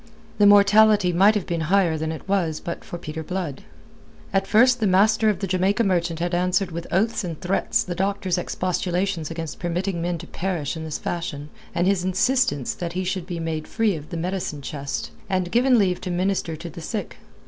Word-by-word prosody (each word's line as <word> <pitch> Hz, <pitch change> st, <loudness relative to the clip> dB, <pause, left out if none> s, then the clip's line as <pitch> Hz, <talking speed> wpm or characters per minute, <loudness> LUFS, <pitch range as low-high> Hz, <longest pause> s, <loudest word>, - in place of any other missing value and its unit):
The 205 Hz, -, +7 dB
mortality 205 Hz, -1 st, +6 dB
might 200 Hz, +5 st, +5 dB
have 205 Hz, -, -1 dB
been 170 Hz, -1 st, -2 dB
higher 185 Hz, -4 st, +3 dB
than 160 Hz, 0 st, -2 dB
it 160 Hz, -, -8 dB
was 175 Hz, -6 st, 0 dB
but 170 Hz, -, -6 dB
for 175 Hz, -, -7 dB
Peter 160 Hz, -1 st, -6 dB
Blood. 170 Hz, -4 st, -4 dB, 0.7 s
At 195 Hz, 0 st, +1 dB
first 245 Hz, +3 st, +5 dB
the 215 Hz, -, +2 dB
master 215 Hz, +4 st, +4 dB
of 205 Hz, -3 st, -1 dB
the -, -, 0 dB
Jamaica 190 Hz, +4 st, +1 dB
Merchant 175 Hz, -4 st, 0 dB
had 175 Hz, +2 st, -2 dB
answered 180 Hz, +2 st, +1 dB
with 170 Hz, 0 st, -6 dB
oaths 220 Hz, +4 st, +1 dB
and 165 Hz, -4 st, -5 dB
threats 185 Hz, +1 st, 0 dB
the 180 Hz, -, -4 dB
doctor's 190 Hz, 0 st, -1 dB
expostulations 180 Hz, -1 st, -1 dB
against 165 Hz, -2 st, -6 dB
permitting 175 Hz, +1 st, -2 dB
men 175 Hz, 0 st, -1 dB
to 165 Hz, -, -9 dB
perish 170 Hz, -5 st, -3 dB
in 160 Hz, -1 st, -6 dB
this 155 Hz, -, -3 dB
fashion, 150 Hz, -4 st, -4 dB, 0.3 s
and 175 Hz, +1 st, +2 dB
his 190 Hz, -2 st, +2 dB
insistence 215 Hz, -, +1 dB
that 170 Hz, -1 st, -5 dB
he 185 Hz, +1 st, -2 dB
should 185 Hz, -1 st, -3 dB
be 175 Hz, -3 st, -4 dB
made 160 Hz, -1 st, -3 dB
free 225 Hz, -4 st, +1 dB
of 150 Hz, -1 st, -9 dB
the 170 Hz, -, -4 dB
medicine 175 Hz, -4 st, -3 dB
chest 140 Hz, 0 st, -4 dB, 0.2 s
and 185 Hz, -2 st, -1 dB
given 250 Hz, +2 st, +4 dB
leave 185 Hz, -4 st, +1 dB
to 185 Hz, -, -4 dB
minister 180 Hz, -2 st, -1 dB
to 170 Hz, +2 st, -8 dB
the 170 Hz, -, -9 dB
sick. 210 Hz, +6 st, -5 dB
180 Hz, 205 wpm, -23 LUFS, 170-195 Hz, 0.7 s, The